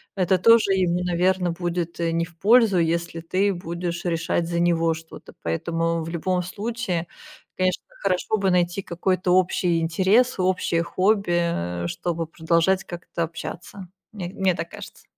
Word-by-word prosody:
это 185 -1 +2
тоже 230 -1 +5
ему, 180 -2 +1
наверно, 180 0 +1
будет, 170 0 -3
э, 170 - 0
не 165 0 0
в 170 -1 -18
пользу, 220 -3 +5
если 170 0 -1
ты 195 +4 +1
будешь 170 -1 -4
решать 165 0 0
за 170 0 -1
него 165 -1 +2
что-то. 160 0 -12
Поэтому, 165 - -1
в 160 - -6
любом 180 +2 -1
случае, 200 -2 -3 0.5
конечно, 185 -1 0 0.2
хорошо 195 +3 0
бы 195 -1 +1
найти 180 +1 +1
какой-то 185 0 -1
общий 180 -2 +2
интерес 190 +9 +2
и - - +2
общее 180 -2 +1
хобби, 190 0 +1
а, 90 - -2
чтобы 165 - -3
продолжать 170 +4 +1
как-то 175 -1 -6
общаться. 175 +3 -7 0.3
Мне 185 -5 -5
мне 190 -1 0
так 165 +1 -5
кажется. - - -11
175 Hz, 155 wpm, -24 LUFS, 170-190 Hz, 0.5 s, тоже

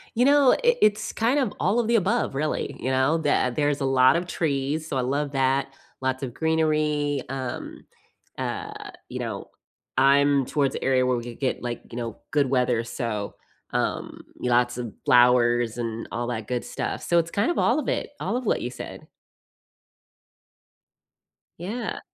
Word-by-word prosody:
You 245 +2 +3
know, 280 -1 +6
i - - +1 0.2
it's 210 0 +3
kind 240 +6 +1
of 255 -7 0
all 200 +6 +2
of 235 - 0
the 235 - +3
above, 220 - +1
really, 150 +2 -2
you 130 - -2
know? 130 +5 +3
That 145 -5 +1
there's 145 -1 +1
a - - +1
lot 130 0 +5
of 175 +1 -1
trees, 150 -1 -1
so 135 - -2
I - - +1
love 140 +3 -1
that, 135 0 +1 0.3
lots 130 +1 -1
of 125 -3 -4
greenery, 155 -2 +1
um 130 -2 -5 0.5
uh, - - -5 0.2
you - - -5
know, - - -5 0.5
I'm 140 +1 +4
towards 140 -1 +1
the - - -4
area 130 -1 +3
where 125 -1 +1
we 120 - -4
could 120 +1 -9
get, 130 - -1
like, 120 -1 -4
you 115 - -7
know, 115 -2 -4
good 145 -4 +2
weather, 125 -3 +2
so, 115 -4 -4 0.4
um, - - -2 0.2
lots 120 0 +2
of 120 -4 -5
flowers 120 -1 +4
and 115 -1 -4
all 120 0 -2
that 110 -3 -4
good 125 -1 -2
stuff, - - -4
so 170 - +2
it's 165 0 -2
kind 205 +9 +1
of - - -3
all 250 +6 +3
of 290 - -4
it - - -1
all 210 +6 -1
of 250 - -5
what - - +1
you 120 - -3
said. - - -9 2.5
Yeah. 220 +7 -4
135 Hz, 180 wpm, -25 LUFS, 125-160 Hz, 2.5 s, know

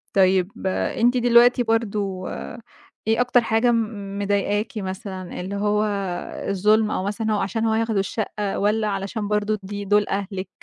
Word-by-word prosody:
طيب 190 0 +3 0.2
أنتِ 240 +6 +1
دلوقتي 245 +1 +5
برضه 205 -5 -1 0.8
إيه 225 +2 +3
أكتر 245 0 +4
حاجة 230 +2 +2
م 210 -3 -2
مضايقاكِ 205 +2 0
مثلًا 190 -1 -5
اللي 195 +2 -5
هو 210 +1 +1 0.7
الظلم 210 +3 +3
أو 185 - -1
مثلًا 215 +2 -1
هو 210 - +1
عشان 220 +4 -1
هو 220 - +2
ياخدوا 225 -2 +1
الشقة، 205 0 -2
والّا 210 +2 +1
علشان 200 +2 -3
برضه 210 0 0
دي 205 +1 -5
دُول 210 +1 +3
أهلِك؟ 195 -1 -3
210 Hz, 145 wpm, -23 LUFS, 195-225 Hz, 0.8 s, دلوقتي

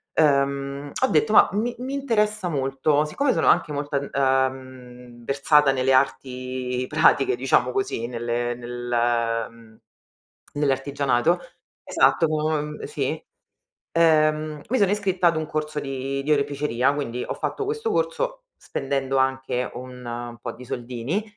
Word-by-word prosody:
uhm, 140 -1 +1
ho - - +5
detto: 225 -4 +2
"Ma - - +7
mi 230 +4 -1
mi 260 +2 -4
interessa 215 -8 0
molto." 145 +1 +1
Siccome 260 - 0
sono - - +1
anche 170 -3 +4
molto 145 0 -3
ad 140 0 -1
uhm, 130 -2 -2
versata 140 +1 +4
nelle 135 0 +1
arti 130 -1 -1
pratiche 385 - +3
diciamo - - +2
così 390 - -2
nelle 120 0 -2
nel 120 -1 -1
mhmm, 115 -1 -18 0.8
nell'artigianato 140 +1 +1 0.4
esatto 165 - +3
co 155 0 0
Ehm, 150 0 -5
sì. 450 - -3 0.7
Ehm 155 -2 +2
mi 260 - +2
sono 200 -4 +3
iscritta 195 -3 +1
ad 165 - 0
un 155 0 -2
corso 155 0 -3
di 135 0 -3
di 150 +2 +1
oreficeria, 140 -2 +1
quindi 125 -4 -3
ho - - -3
fatto 425 - -3
questo 445 +1 -2
corso - - -1 0.2
spendendo 135 -1 -2
anche 130 -1 0
un 120 -2 -7
po' 120 -1 -5
di 125 +2 -12
soldini, 125 - -3
140 Hz, 140 wpm, -24 LUFS, 125-155 Hz, 0.8 s, Ma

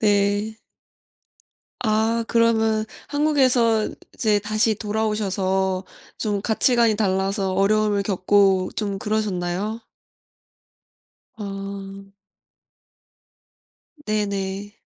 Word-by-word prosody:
네. 205 +1 +1 1.2
아. 220 0 +2 0.2
그러면 225 -2 +2 0.2
한국에서 255 -7 +3 0.3
이제 215 -3 +2
다시 215 +2 +1
돌아오셔서 195 -3 -1 0.3
좀 205 -2 -1
가치관이 230 +1 +3
달라서 195 -1 0
어려움을 205 +1 +2
겪고 195 -1 +2
좀 200 -2 -2
그러셨나요? 210 0 -2 1.6
아. 195 -1 -7 1.9
네네. 200 -1 -2
205 Hz, 165 characters per minute, -22 LUFS, 195-220 Hz, 1.9 s, 한국에서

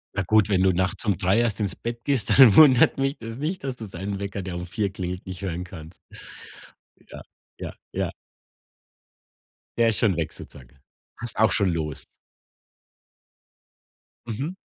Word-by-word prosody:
Na 100 - 0
gut, 105 +2 +3
wenn 95 -3 +2
du 95 0 +4
nachts 90 +5 -2
um 100 -5 +1
3 95 +5 +2
erst 115 -3 0
ins 100 -2 -2
Bett 120 0 -6
gehst, 130 -7 0
dann 125 -7 +8
wundert 135 -6 +7
mich 135 +1 0
das 115 0 -8
nicht, 155 +3 -3
dass 130 -2 -3
du 115 - -8
seinen 95 +2 -5
Wecker, 100 -1 -5
der 90 -2 -5
um 90 0 -5
4 100 +2 -2
klingelt, 90 -1 -5
nicht 95 0 -8
hören 90 -2 -3
kannst. 85 -2 -11 1.1
Ja, - - -9 0.4
ja, - - -7 0.2
ja. - - -2 1.7
Der 115 -1 +4
ist 110 - +1
schon 100 -6 +2
weg 80 -2 -2
sozusagen. 65 -1 -13 0.4
Hast 120 -1 -7
auch 110 - +4
schon 100 -4 +2
los? 75 -3 -4 2.2
Mhm. 135 - -4
100 Hz, 165 wpm, -24 LUFS, 90-115 Hz, 2.2 s, dann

